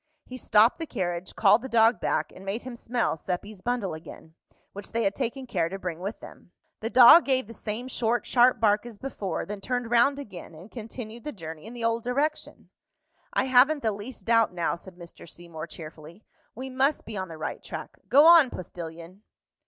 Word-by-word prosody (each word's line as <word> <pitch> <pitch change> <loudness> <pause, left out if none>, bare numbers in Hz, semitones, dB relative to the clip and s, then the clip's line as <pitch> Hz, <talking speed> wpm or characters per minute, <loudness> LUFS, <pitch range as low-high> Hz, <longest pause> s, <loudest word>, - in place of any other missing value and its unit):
He 255 - -9
stopped 225 0 +3
the 325 - -4
carriage, 180 -5 -4
called 210 +1 +5
the 265 - -7
dog 225 -1 +4
back, - - -1
and 190 - -12
made 195 +4 -4
him 255 -1 -7
smell 235 -5 -1
Seppi's 185 +4 -5
bundle 240 -6 -2
again, 160 0 -11 0.4
which 200 +2 -9
they 230 0 0
had 200 -1 +1
taken 260 +2 -4
care 175 -9 -1
to 195 - -5
bring 180 -4 -5
with 200 +5 -5
them. 175 - -14 0.3
The 225 - -3
dog 255 +8 +9
gave 260 -2 +1
the 230 - -11
same 225 +3 -5
short 240 -2 -1
sharp 245 -1 +4
bark 210 -1 +3
as 230 -3 -11
before, 210 -6 -4
then 205 0 -7
turned 245 +1 -3
round 240 +4 +4
again, 190 - -9
and 175 +7 -13
continued 230 0 -8
the 300 - -5
journey 160 - -9
in 235 - -10
the 235 - -6
old 230 0 +1
direction. 280 +6 -3 0.6
"I - - +1
haven't 265 +3 +4
the 220 - +2
least 210 +5 -9
doubt 230 -1 +3
now," 175 -1 -1
said 175 +1 -10
Mr. 170 -1 -12
Seymour, 170 -1 -9
cheerfully. 160 +4 -11 0.3
"We 260 +3 -7
must 270 +3 +1
be 220 - -7
on 190 -1 -3
the 165 -2 -9
right 155 - -5
track. 160 - -8
Go 280 +7 +7
on, 330 -5 +8
postilion!" 170 0 -9
220 Hz, 200 wpm, -26 LUFS, 180-245 Hz, 0.6 s, dog